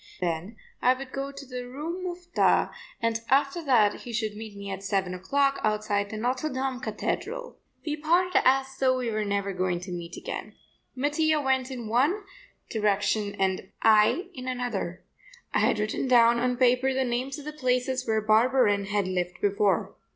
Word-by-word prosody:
Then 180 +5 -3 0.2
I 255 +1 +4
would 265 0 -8
go 275 0 -4
to 280 0 -10
the 250 -1 -6
Rue 310 +8 -5
Mouffetard 355 -1 +1 0.3
and 225 0 +1
after 280 +5 +2
that 220 -7 +4
he 240 - -8
should 220 -2 -2
meet 215 -1 -8
me 200 0 -6
at 195 0 -5
seven 195 -2 -1
o'clock 275 +10 +1
outside 210 -1 0
the 215 - -5
Notre 255 +6 -1
Dame 260 -1 -2
Cathedral. 485 - -4 0.3
We 300 -1 -2
parted 345 +4 +3
as 270 +1 +3
though 255 -1 +3
we 245 -2 -2
were 215 0 -1
never 200 -1 -1
going 180 -1 0
to 180 +1 -7
meet 170 -1 -6
again. - - -6 0.4
Mattia 300 +3 +2
went 265 -2 +1
in 245 -4 -6
one 285 - +2 0.5
direction, 205 -1 +1 0.5
I 220 - +5
in 255 -3 -7
another. 240 -8 -3 0.5
I - - +3
had - - +3
written 215 +5 -1
down 235 -1 +5
on 250 0 0
paper 255 +1 +3
the 265 - +2
names 255 +3 -2
of 290 - -10
the 300 - -5
places 255 -2 0
where 220 -1 +2
Barberin 215 -1 +3
had 205 -1 0
lived 180 -1 -2
before. 200 -2 +1
245 Hz, 175 wpm, -27 LUFS, 205-270 Hz, 0.5 s, I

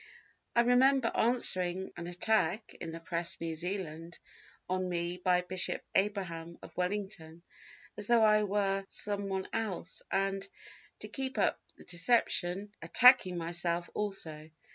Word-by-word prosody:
"I 235 - +6
remember 250 +1 +4
answering 190 -6 +1
an 175 0 -6
attack 185 +2 0
(in 165 - -4
the 165 - -7
Press, 170 +2 -3
New 165 -1 -3
Zealand) 170 -1 -5 0.5
on 185 0 -1
me 175 0 -2
by 180 0 +2
Bishop 185 0 -1
Abraham, 175 -5 -1
of - - -12
Wellington, 180 -3 -3 0.5
as 210 -1 -4
though 235 -2 +5
I 215 0 +5
were 195 -1 0
someone 200 -2 -2
else, 195 -6 -3
and, 195 0 -1 0.5
to - - -5
keep 265 -1 -4
up - - +1 0.2
the - - -14
deception, 180 0 +1
attacking 245 -8 +6
myself 170 +1 -1
also. 160 -7 -3
185 Hz, 130 wpm, -32 LUFS, 170-210 Hz, 0.5 s, I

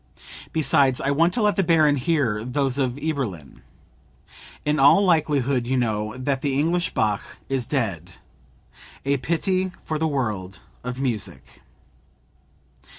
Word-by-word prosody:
Besides 140 -4 +2
I 140 - 0
want 165 +5 +3
to 235 - +1
let 210 0 +2
the - - +4
baron 155 -4 +4
hear 130 -7 0
those 135 +2 -1
of 130 -3 0
Eberlin. 135 - -4 1.0
In 150 0 +1
all 145 +9 +6
likelihood 140 -7 +1
you 130 +1 +1
know 110 -1 -1
that 135 +1 -1
the 140 -3 0
English 170 +4 0
Bach 105 -2 -1
is 130 -3 -1
dead; 95 - -2 0.9
a 140 0 +2
pity 185 +6 0
for 155 -1 -3
the 160 - +1
world 105 -10 -3 0.2
of 125 +1 -5
music." 105 - -4
135 Hz, 135 wpm, -23 LUFS, 120-155 Hz, 1.0 s, all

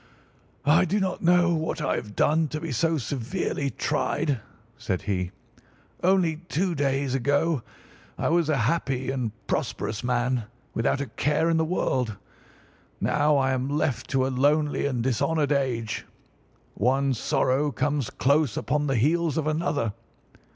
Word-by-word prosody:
"I 160 +6 +5
do 200 +5 +1
not 190 -2 -1
know 175 0 +4
what 160 0 -2
I - - 0
have 105 -2 -6
done 155 +1 +3
to 155 +1 -4
be 165 -1 -5
so 160 +7 +1
severely 140 +2 -2
tried," 135 0 -1 0.4
said 90 - -3
he. 90 -3 -1 0.7
"Only 180 -4 +3
two 175 +2 -1
days 135 -2 0
ago 145 +3 +1 0.6
I - - 0
was 165 -1 +2
a 150 - +2
happy 135 -3 0
and 125 -5 -2
prosperous 110 +1 -2
man, 125 -1 0 0.3
without 115 +4 +1
a - - -1
care 150 +7 +1
in 165 - +2
the 160 - +2
world. 130 - -1 0.8
Now 150 0 +2
I 135 -1 +2
am 130 +1 -1
left 140 -5 -1
to 130 -1 +2
a - - 0
lonely 145 +2 +2
and 125 -4 -1
dishonoured 145 +4 +1
age. 125 -6 -1 0.7
One 135 +4 +2
sorrow 135 +3 +1
comes 140 0 -1
close 140 -2 +2
upon 150 0 0
the 135 - +1
heels 155 +6 +2
of 160 - 0
another. 150 -8 0
140 Hz, 150 wpm, -26 LUFS, 130-160 Hz, 0.8 s, I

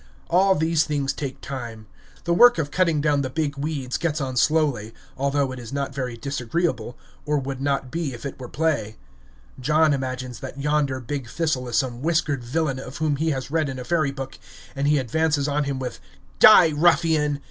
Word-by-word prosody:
All 190 +2 +4
these 160 0 +2
things 145 -3 -1
take 135 -3 -6
time. 120 -5 -7 0.4
The 170 - +1
work 240 +7 +7
of 145 -3 -2
cutting 170 -5 +2
down 145 -2 +2
the 130 - -2
big 145 0 -2
weeds 140 -3 -3
gets 160 -2 -1
on 130 -2 -3
slowly, 130 -6 +1 0.2
although 140 0 0
it 130 - -7
is 115 -2 -9
not 140 -1 -3
very 125 -3 -4
disagreeable, 130 0 -2 0.3
or 150 0 0
would 135 -1 -4
not 135 -2 -1
be 165 -4 -2
if 120 +2 -9
it 140 - -6
were 125 -2 -8
play. 145 -9 -1 0.6
John 150 +3 +3
imagines 130 -2 -4
that 135 +1 -8
yonder 145 -2 0
big 130 +1 -5
thistle 155 -6 -1
is 120 - -3
some 125 -3 -1
whiskered 155 -4 0
villain, 135 +1 -1
of 130 0 -8
whom 155 -3 0
he 160 +3 0
has 135 -2 -3
read 160 -2 +1
in 130 - -5
a 125 - -5
fairy 155 0 +1
book, 135 -1 -7 0.4
and 140 +1 0
he 150 0 +4
advances 145 +3 0
on 145 0 0
him 140 -1 -2
with 130 -1 -5 0.4
"Die, 180 -7 +8
ruffian!" 155 -3 +3
140 Hz, 195 wpm, -23 LUFS, 130-155 Hz, 0.6 s, Die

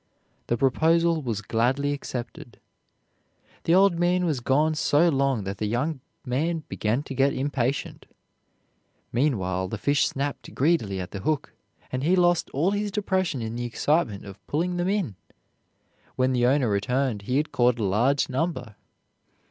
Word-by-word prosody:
The 120 - 0
proposal 165 +5 +2
was 115 -6 -3
gladly 130 +7 +1
accepted. 125 -3 -7 1.1
The 165 - +4
old 190 -3 +4
man 180 +1 +2
was 155 -6 0
gone 150 +6 +2
so 155 +2 +3
long 135 -6 +1
that 95 +1 -5
the 105 - -1
young 135 +7 -1 0.3
man 155 +6 -1
began 115 +6 -1
to 135 - -7
get 135 +1 +2
impatient. 135 -1 -2 1.1
Meanwhile 95 - 0
the 110 - -4
fish 145 +7 +2
snapped 140 +1 -4
greedily 130 - +1
at 90 +1 -6
the 100 - -5
hook, 150 +8 -2 0.4
and 130 - -2
he 170 +6 +3
lost 175 -1 +2
all 160 +8 +1
his 205 0 -1
depression 190 - -1
in 110 0 -4
the 120 0 -3
excitement 120 - 0
of 100 0 -11
pulling 175 +4 -1
them 175 +1 0
in. 190 - -1 1.0
When 130 0 +1
the 120 -1 +3
owner 135 -1 +3
returned 120 +2 0
he 125 +6 -1
had 150 +2 -1
caught 120 0 +3
a 115 - -2
large 120 +9 +2
number. 130 - -3
135 Hz, 155 wpm, -25 LUFS, 120-160 Hz, 1.1 s, The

